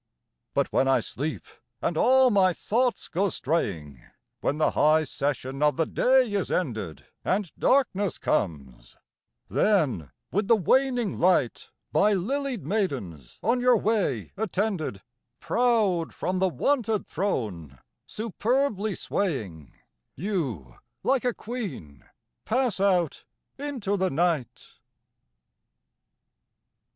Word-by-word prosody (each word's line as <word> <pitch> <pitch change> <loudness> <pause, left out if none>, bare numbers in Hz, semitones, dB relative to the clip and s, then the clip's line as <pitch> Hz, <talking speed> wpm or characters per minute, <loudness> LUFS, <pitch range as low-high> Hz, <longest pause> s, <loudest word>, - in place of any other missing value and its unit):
But - - 0
when 135 - +3
I 135 - +4
sleep, 155 +4 -4 0.4
and 170 - -1
all 255 +7 +5
my 190 -3 +4
thoughts 240 +7 0
go 195 +4 0
straying, 85 - -2 0.4
When 145 - -1
the 155 - +2
high 155 +1 +4
session 135 -1 -3
of 150 0 +3
the 165 - +2
day 255 +1 +3
is 200 -2 -1
ended, 110 - -3 0.2
And 190 -3 0
darkness 205 -8 +1
comes; 70 - -3 0.5
then, 145 - +1 0.2
with 205 +1 0
the 230 - +6
waning 245 - +1
light, 175 -9 +2 0.2
By 210 +1 +4
lilied 260 +4 -2
maidens 130 - -3
on 240 +5 +2
your 250 -1 +5
way 195 - 0
attended, 185 - -2 0.4
Proud 215 -9 +1
from 185 0 -2
the 190 0 +3
wonted 225 - 0
throne, 100 - -3 0.3
superbly 220 -1 -1
swaying, 105 - -3 0.4
You, 135 - -3 0.3
like 265 -2 +1
a 245 - +3
queen, 180 - -7 0.4
pass 245 -4 0
out 180 -5 +1 0.4
into 255 -9 -2
the 190 0 +1
night. 160 -5 -2
185 Hz, 110 wpm, -26 LUFS, 135-220 Hz, 0.5 s, the